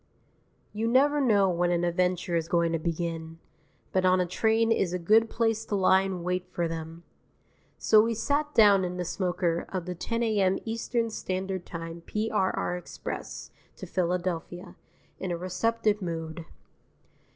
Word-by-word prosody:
III 215 Hz, -, -5 dB
You 225 Hz, -, +1 dB
never 285 Hz, +5 st, +3 dB
know 205 Hz, -7 st, +4 dB
when 175 Hz, 0 st, +1 dB
an 175 Hz, 0 st, +1 dB
adventure 180 Hz, 0 st, 0 dB
is 165 Hz, -1 st, 0 dB
going 170 Hz, -1 st, +2 dB
to 165 Hz, -, 0 dB
begin. 165 Hz, 0 st, -3 dB, 0.5 s
But 185 Hz, -, +1 dB
on 185 Hz, 0 st, +4 dB
a 180 Hz, -, +2 dB
train 220 Hz, +5 st, +1 dB
is 190 Hz, -5 st, +1 dB
a -, -, 0 dB
good 215 Hz, +6 st, +4 dB
place 225 Hz, -1 st, 0 dB
to 205 Hz, -, -2 dB
lie 190 Hz, 0 st, +4 dB
in 190 Hz, -3 st, -4 dB
wait 180 Hz, 0 st, -2 dB
for 175 Hz, -2 st, -1 dB
them. 165 Hz, +1 st, -7 dB, 0.7 s
So 215 Hz, -1 st, +5 dB
we 230 Hz, +1 st, 0 dB
sat 290 Hz, +6 st, -1 dB
down 205 Hz, -3 st, +6 dB
in 180 Hz, 0 st, -3 dB
the 180 Hz, -, -2 dB
smoker 175 Hz, -2 st, -1 dB
of 185 Hz, -3 st, -4 dB
the 180 Hz, -, -4 dB
10 230 Hz, +7 st, -2 dB
A.M. 200 Hz, -4 st, +2 dB
Eastern 230 Hz, 0 st, -1 dB
Standard 190 Hz, -2 st, -4 dB
Time 165 Hz, 0 st, -7 dB
P.R.R. 210 Hz, -4 st, -1 dB
express 180 Hz, -, -7 dB, 0.2 s
to -, -, -8 dB
Philadelphia, 180 Hz, 0 st, -3 dB, 0.4 s
in 190 Hz, -, -4 dB
a 175 Hz, -, -1 dB
receptive 210 Hz, +4 st, 0 dB
mood. 165 Hz, -2 st, -5 dB
185 Hz, 160 wpm, -28 LUFS, 170-215 Hz, 0.7 s, down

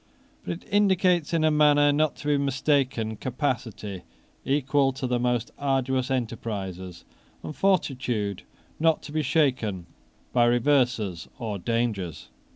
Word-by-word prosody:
But -, -, -3 dB
it 170 Hz, -, -10 dB
indicates 185 Hz, -5 st, +3 dB
in 165 Hz, -2 st, +1 dB
a 155 Hz, -, +4 dB
manner 145 Hz, -1 st, +5 dB
not 155 Hz, 0 st, +1 dB
to 150 Hz, -, -8 dB
be 145 Hz, -, +4 dB
mistaken 135 Hz, -5 st, 0 dB
capacity 120 Hz, -, -3 dB, 0.4 s
equal 140 Hz, 0 st, +2 dB
to 130 Hz, -, -4 dB
the 125 Hz, -1 st, 0 dB
most 120 Hz, -1 st, 0 dB
arduous 130 Hz, -2 st, 0 dB
enterprises, 100 Hz, -8 st, -4 dB, 0.4 s
and 155 Hz, -, -6 dB
fortitude 125 Hz, -, 0 dB, 0.4 s
not 160 Hz, 0 st, +2 dB
to -, -, -9 dB
be 155 Hz, +1 st, 0 dB
shaken 125 Hz, -, 0 dB, 0.5 s
by 120 Hz, -1 st, +4 dB
reverses 120 Hz, -, +1 dB
or 105 Hz, -4 st, -4 dB
dangers. 105 Hz, -6 st, -2 dB
130 Hz, 130 wpm, -26 LUFS, 110-145 Hz, 0.5 s, manner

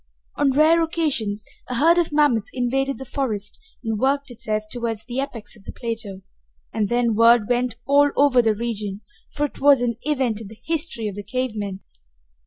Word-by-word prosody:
On 285 Hz, -, +2 dB
rare 310 Hz, +5 st, +4 dB
occasions 285 Hz, -11 st, -1 dB, 0.2 s
a 250 Hz, -, -2 dB
herd 330 Hz, +7 st, +5 dB
of 340 Hz, -, 0 dB
mammoths 290 Hz, -8 st, +2 dB
invaded 270 Hz, +2 st, -1 dB
the 265 Hz, -, -8 dB
forest 225 Hz, -7 st, -3 dB, 0.2 s
and 220 Hz, -2 st, -2 dB
worked 275 Hz, +1 st, +1 dB
itself 215 Hz, -3 st, -3 dB
toward 235 Hz, -1 st, -3 dB
the 250 Hz, +1 st, -3 dB
apex 250 Hz, -7 st, -5 dB
of 210 Hz, -, -18 dB
the -, -, -6 dB
plateau, 220 Hz, -5 st, -5 dB, 0.5 s
and 210 Hz, -3 st, 0 dB
then 240 Hz, -1 st, +2 dB
word 230 Hz, 0 st, +5 dB
went 245 Hz, -1 st, 0 dB
all 285 Hz, +2 st, +5 dB
over 275 Hz, -3 st, +5 dB
the 220 Hz, -2 st, +2 dB
region, 210 Hz, -3 st, -4 dB, 0.3 s
for 295 Hz, -, -1 dB
it 290 Hz, -, -8 dB
was 280 Hz, -3 st, +6 dB
an 235 Hz, -2 st, -1 dB
event 260 Hz, -7 st, -1 dB
in 220 Hz, -, -8 dB
the 215 Hz, +2 st, -13 dB
history 315 Hz, -9 st, -2 dB
of 205 Hz, -, -4 dB
the 205 Hz, -, -6 dB
cave 255 Hz, +5 st, -2 dB
men. 200 Hz, -2 st, -4 dB
245 Hz, 190 wpm, -22 LUFS, 215-280 Hz, 0.5 s, was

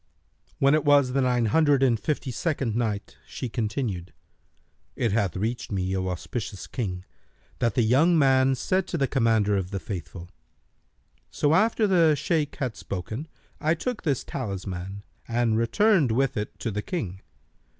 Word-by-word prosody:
When 140 Hz, +1 st, +4 dB
it 155 Hz, -1 st, +3 dB
was 145 Hz, -3 st, +4 dB
the 135 Hz, +1 st, +1 dB
Nine 125 Hz, -2 st, +2 dB
Hundred 145 Hz, +3 st, +3 dB
and 120 Hz, -4 st, +3 dB
Fifty 140 Hz, +3 st, -2 dB
second 135 Hz, -5 st, -1 dB
Night, 110 Hz, -4 st, -2 dB
She 125 Hz, -, -5 dB
continued, 105 Hz, -6 st, -3 dB, 0.8 s
It 115 Hz, -4 st, 0 dB
hath 100 Hz, -5 st, 0 dB
reached 115 Hz, +5 st, -3 dB
me, 95 Hz, -1 st, -1 dB
O 95 Hz, 0 st, -1 dB
auspicious 100 Hz, +3 st, -5 dB
King, 90 Hz, -7 st, -4 dB, 0.5 s
that 115 Hz, -3 st, +1 dB
the 120 Hz, -, +3 dB
young 150 Hz, +10 st, +4 dB
man 135 Hz, -2 st, +4 dB
said 185 Hz, +8 st, 0 dB
to 170 Hz, -, -2 dB
the 140 Hz, -, +2 dB
Commander 115 Hz, -6 st, +2 dB
of 95 Hz, -2 st, -2 dB
the 100 Hz, 0 st, -3 dB
Faithful, 90 Hz, -3 st, -7 dB, 1.0 s
"'So 145 Hz, +1 st, +1 dB
after 220 Hz, +4 st, +3 dB
the 170 Hz, -6 st, +4 dB
Shaykh 150 Hz, 0 st, -1 dB
had 130 Hz, -7 st, -3 dB
spoken, 110 Hz, -, -5 dB, 0.3 s
I 160 Hz, +2 st, +2 dB
took 245 Hz, +7 st, -3 dB
this 140 Hz, -6 st, 0 dB
talisman 95 Hz, -4 st, -5 dB, 0.2 s
and 115 Hz, -1 st, +1 dB
returned 155 Hz, -, +3 dB
with 135 Hz, +3 st, +1 dB
it 105 Hz, 0 st, -4 dB
to 115 Hz, -, -2 dB
the 105 Hz, +1 st, -2 dB
King. 105 Hz, -, -4 dB
120 Hz, 160 wpm, -26 LUFS, 100-145 Hz, 1.0 s, When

